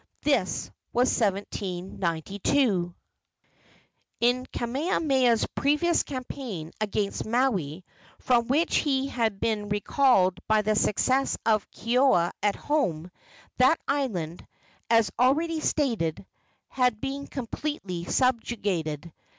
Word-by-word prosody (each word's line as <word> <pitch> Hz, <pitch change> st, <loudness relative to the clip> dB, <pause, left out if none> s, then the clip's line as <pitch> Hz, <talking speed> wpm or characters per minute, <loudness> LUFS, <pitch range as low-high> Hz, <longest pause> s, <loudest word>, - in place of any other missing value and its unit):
This 275 Hz, -11 st, 0 dB, 0.2 s
was 250 Hz, +2 st, +3 dB
in 200 Hz, -4 st, +3 dB
1792. 190 Hz, -, -1 dB, 1.2 s
In 245 Hz, +2 st, +2 dB
Kamehameha's 260 Hz, -2 st, +1 dB
previous 300 Hz, +4 st, +2 dB
campaign 250 Hz, -, -6 dB
against 210 Hz, -1 st, -1 dB
Maui, 195 Hz, -, 0 dB, 0.3 s
from 235 Hz, -2 st, +2 dB
which 305 Hz, +6 st, +2 dB
he 275 Hz, -2 st, +1 dB
had 225 Hz, -6 st, -1 dB
been 210 Hz, -2 st, -1 dB
recalled 205 Hz, -3 st, +2 dB
by 215 Hz, -1 st, +3 dB
the 215 Hz, +1 st, +1 dB
successes 260 Hz, +6 st, +1 dB
of 215 Hz, -2 st, +2 dB
Keoua 235 Hz, -7 st, +2 dB
at 205 Hz, -1 st, +1 dB
home, 180 Hz, -, -1 dB, 0.5 s
that 260 Hz, +6 st, +5 dB
island, 200 Hz, -, -2 dB, 0.5 s
as 225 Hz, -4 st, +4 dB
already 315 Hz, +6 st, +2 dB
stated, 230 Hz, -, -1 dB, 0.4 s
had 250 Hz, -4 st, +1 dB
been 275 Hz, +3 st, -4 dB
completely 230 Hz, -, -4 dB
subjugated. 190 Hz, -, -1 dB
230 Hz, 100 wpm, -27 LUFS, 190-270 Hz, 1.2 s, that